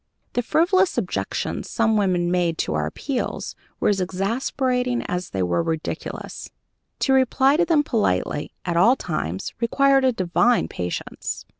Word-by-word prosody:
The 245 - +1
frivolous 360 +8 +2
objections 200 -7 -2
some 225 -1 +2
women 180 -4 +1
made 175 -2 +1
to - - -1
our 75 0 0
appeals 255 - -3 0.3
were - - +2
as 195 -2 +1
exasperating 245 +6 -1
as 180 0 -3
they 95 -1 -1
were 85 -1 +1
ridiculous. 160 -1 -4 0.5
To 270 - +3
reply 265 +1 +4
to 350 - +3
them 320 -4 +3
politely, 150 - 0
at 175 - -1
all 225 +10 +5
times, 95 - -4
required 270 +3 +3
a 260 - +4
divine 230 +4 +2
patience. 90 -1 -5
225 Hz, 145 wpm, -23 LUFS, 170-260 Hz, 0.5 s, all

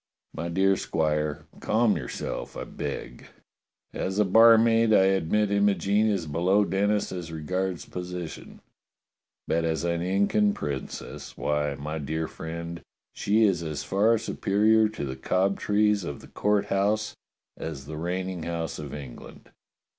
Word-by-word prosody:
"My 85 +1 -4
dear 95 +3 +3
Squire, 75 -2 -1
cahn 110 -1 +2
yourself, - - -5
I - - -4
beg. - - -6 0.7
As 95 +1 -3
a 105 - +4
bar 115 +4 +7
maid 115 0 +4
I 95 - +6
admit 95 +2 +2
Imogene 100 +1 +2
is 100 -6 0
below 90 +7 +2
Denis 100 +3 0
as 85 -3 -6
regards 90 +3 -3
posi 90 -1 -5
tion, - - -11 0.9
but 85 +1 +1
as 80 -1 -1
an 85 -1 0
Incan 100 +3 +2
princess, 70 -3 -6
why, 75 -1 0
my 75 +3 -5
dear 80 +2 -2
friend, 85 +1 -6 0.3
she 110 +2 +2
is 95 -5 +3
as 80 -3 -4
far 110 +4 +3
superior 110 +2 +2
to 110 -9 -5
the 65 -1 -4
Cobtrees 100 +6 +1
of 70 -4 -6
the - - -14
Court 105 -1 +1
House 105 +2 0 0.4
as 75 -4 -6
the 75 +1 -7
reigning 90 +1 -3
house 80 -1 -4
of 75 -3 -6
England. 70 -5 -11
95 Hz, 145 wpm, -26 LUFS, 80-105 Hz, 0.9 s, bar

